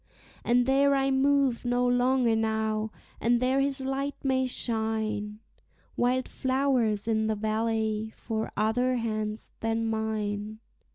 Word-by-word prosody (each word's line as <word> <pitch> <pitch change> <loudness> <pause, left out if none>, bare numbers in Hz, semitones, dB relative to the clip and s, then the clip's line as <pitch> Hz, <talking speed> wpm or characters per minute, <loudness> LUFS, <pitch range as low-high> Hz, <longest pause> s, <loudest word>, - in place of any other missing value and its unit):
And 245 +1 +3
there 275 +1 +4
I 270 0 +1
move 270 -2 +2
no 245 0 +1
longer 245 -1 +3
now, 220 -1 0 0.3
and 240 +1 +2
there 260 +2 +2
his 275 0 0
light 270 +2 -2
may 260 -1 +1
shine, 220 -3 -2 0.6
Wild 250 +1 +1
flowers 255 -5 +1
in 220 -1 +1
the 220 - 0
valley 220 0 -1
for 220 -1 -4
other 245 +4 +1
hands 215 -2 -3
than 225 0 -1
mine. 215 -1 -2
230 Hz, 125 wpm, -28 LUFS, 220-260 Hz, 0.6 s, there